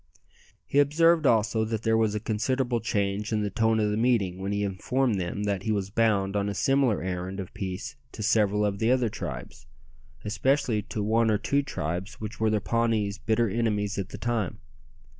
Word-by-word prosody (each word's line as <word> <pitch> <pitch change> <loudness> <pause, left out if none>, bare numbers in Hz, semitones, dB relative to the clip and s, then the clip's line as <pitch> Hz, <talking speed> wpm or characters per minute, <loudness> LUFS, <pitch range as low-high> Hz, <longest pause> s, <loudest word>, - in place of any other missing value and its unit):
He 140 - +1
observed 160 +2 +4
also 110 -1 +2
that 110 0 -3
there 110 -1 +2
was 110 -2 +2
a - - 0
considerable 120 +3 0
change 100 -1 -1
in 105 -1 +1
the 100 - -2
tone 110 +2 +2
of 105 -1 +1
the 105 - -1
meeting 110 -6 +1
when 95 +1 -3
he 100 0 0
informed 105 +4 0
them 90 +4 -3
that 100 -2 -1
he 110 - -1
was 100 -2 -1
bound 105 -3 +1
on 100 0 0
a 100 - -4
similar 135 -4 +2
errand 90 +1 -4
of 95 - -7
peace 100 +7 -5 0.2
to 110 - -5
several 105 -2 +2
of 100 -1 -1
the 110 - +2
other 125 -2 +3
tribes, - - -7 0.6
especially 115 +1 +1
to 105 0 -4
one 115 +2 +2
or 105 - +3
two 140 +7 +1
tribes 90 - -4
which 110 +1 -6
were 110 0 +2
the 105 0 +1
Pawnees' 110 -2 0
bitter 115 +1 +1
enemies 105 -2 -1
at 100 0 -4
that - - -9
time. 115 -6 -1
110 Hz, 195 wpm, -27 LUFS, 100-115 Hz, 0.6 s, observed